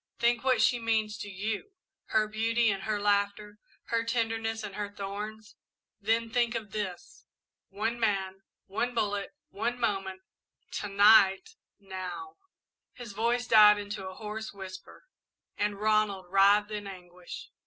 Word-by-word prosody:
Think 235 Hz, 0 st, +2 dB
what 255 Hz, -4 st, +3 dB
she 240 Hz, +2 st, +3 dB
means 220 Hz, -2 st, 0 dB
to 205 Hz, -, -6 dB
you 210 Hz, -, -4 dB, 0.3 s
her 215 Hz, -1 st, +2 dB
beauty 225 Hz, +1 st, +1 dB
and 195 Hz, -1 st, -4 dB
her 215 Hz, -1 st, -1 dB
laughter 205 Hz, +1 st, 0 dB, 0.3 s
her 230 Hz, 0 st, +1 dB
tenderness 225 Hz, -1 st, -1 dB
and 205 Hz, -2 st, -6 dB
her 205 Hz, 0 st, -4 dB
thorns 205 Hz, +2 st, -7 dB, 0.4 s
then 225 Hz, +2 st, 0 dB
think 235 Hz, 0 st, +1 dB
of 215 Hz, -3 st, -5 dB
this! 190 Hz, -4 st, -6 dB, 0.4 s
One 220 Hz, +4 st, -2 dB
man 195 Hz, -3 st, 0 dB, 0.2 s
one 240 Hz, +5 st, -2 dB
bullet 205 Hz, -3 st, -1 dB, 0.2 s
one 240 Hz, +4 st, -2 dB
moment 195 Hz, -3 st, -1 dB, 0.6 s
to 205 Hz, -, -4 dB
night 200 Hz, -, +5 dB, 0.3 s
now!" 195 Hz, -, -7 dB, 0.6 s
His 240 Hz, -4 st, -9 dB
voice 235 Hz, +3 st, 0 dB
died 210 Hz, -2 st, +7 dB
into 205 Hz, -1 st, -5 dB
a 185 Hz, -, -10 dB
hoarse 215 Hz, +1 st, -6 dB
whisper 190 Hz, -, -10 dB, 0.5 s
and 205 Hz, -1 st, -1 dB
Ronald 215 Hz, -3 st, +1 dB
writhed 200 Hz, +2 st, +5 dB
in 205 Hz, -1 st, -4 dB
anguish. 180 Hz, -2 st, -10 dB
210 Hz, 140 wpm, -29 LUFS, 200-225 Hz, 0.6 s, died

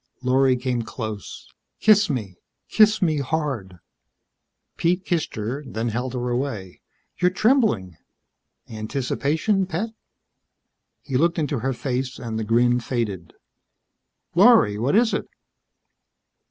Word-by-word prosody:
Lorry 130 Hz, +1 st, +3 dB
came 125 Hz, -1 st, -2 dB
close. 110 Hz, -2 st, -7 dB, 0.3 s
"Kiss 210 Hz, -2 st, +5 dB
me. 110 Hz, -, -3 dB, 0.3 s
Kiss 215 Hz, -1 st, +4 dB
me 155 Hz, -4 st, +1 dB
hard." 135 Hz, -, -3 dB, 1.0 s
Pete 180 Hz, +2 st, 0 dB
kissed 170 Hz, -3 st, -1 dB
her, 120 Hz, +7 st, -4 dB
then 115 Hz, -3 st, -3 dB
held 125 Hz, +3 st, -3 dB
her 125 Hz, 0 st, -2 dB
away. 120 Hz, -8 st, -4 dB, 0.4 s
"You're 180 Hz, 0 st, +4 dB
trembling. 190 Hz, -, +1 dB, 0.7 s
Anticipation, 140 Hz, -, -1 dB
pet?" 190 Hz, +6 st, -2 dB, 1.1 s
He 135 Hz, -3 st, -1 dB
looked 170 Hz, +5 st, +2 dB
into 145 Hz, -4 st, -1 dB
her 135 Hz, +3 st, -1 dB
face 130 Hz, +1 st, -3 dB
and 115 Hz, -3 st, -4 dB
the -, -, -2 dB
grin 120 Hz, +3 st, +3 dB
faded. 105 Hz, -9 st, -3 dB, 1.0 s
"Lorry, 105 Hz, 0 st, +5 dB
what 130 Hz, -, +1 dB
is 230 Hz, +1 st, +3 dB
it?" -, -, -2 dB
130 Hz, 115 wpm, -23 LUFS, 115-160 Hz, 1.1 s, Kiss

